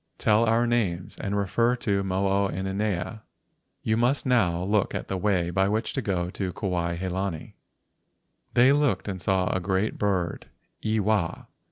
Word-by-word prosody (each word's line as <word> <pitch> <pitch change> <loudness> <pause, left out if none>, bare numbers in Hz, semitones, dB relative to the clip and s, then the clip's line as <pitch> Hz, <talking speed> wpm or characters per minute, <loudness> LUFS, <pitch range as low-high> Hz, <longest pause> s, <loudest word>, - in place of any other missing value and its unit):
Tell 110 +2 +3
our 115 +1 +3
names 100 -8 -1
and 100 0 -2
refer 110 +5 +2
to 100 -5 0
Mo 95 +1 0
o 100 0 +2
inanea. 95 +2 -2 0.6
You 110 0 +1
must 125 +4 +2
now 90 -9 +2
look 100 +1 +1
at - - -4
the 95 - -1
way 90 -3 +1
by 95 +2 +2
which 110 +2 -1
to 135 - -1
go 90 -5 -1
to 95 -2 -3
Kuai 85 -4 -2
he 95 +2 -3
lani. 90 -3 -4 1.0
They 125 +3 +6
looked 145 -5 +1
and 95 -3 -4
saw 95 -1 +1
a - - +1
great 95 +3 -1
bird—Iwa. 100 +1 -2
100 Hz, 160 wpm, -26 LUFS, 95-110 Hz, 1.0 s, They